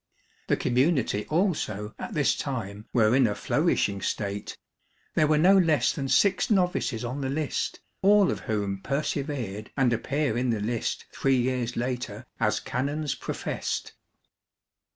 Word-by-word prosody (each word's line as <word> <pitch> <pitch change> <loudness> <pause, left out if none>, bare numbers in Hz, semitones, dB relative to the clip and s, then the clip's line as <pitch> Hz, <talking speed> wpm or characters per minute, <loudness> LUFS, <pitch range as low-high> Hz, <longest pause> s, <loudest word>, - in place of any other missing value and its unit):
The - - +2
community 130 -4 +1
also 150 - -1
at - - -6
this 150 -2 +3
time 110 -6 -5
were 115 -1 +4
in 130 -3 +5
a 105 - -1
flourishing 100 -1 +1
state; 100 -1 -3 0.6
there 155 - +3
were 155 0 +3
no 180 +6 +6
less 165 -6 +3
than 135 -3 -3
six 160 +9 +3
novices 180 - +1
on 130 +4 -4
the 135 - -2
list, 150 +1 -2 0.2
all 200 0 +5
of - - -3
whom 100 -3 -1
persevered 135 -7 -3
and 125 -3 +3
appear 140 +4 0
in 125 +1 0
the 115 -2 +1
list 115 +2 -2
three 135 -1 +2
years 125 -1 -1
later 125 -2 -3
as 105 -2 +2
canons 145 +3 -2
professed. - - -4
130 Hz, 145 wpm, -27 LUFS, 110-150 Hz, 0.6 s, no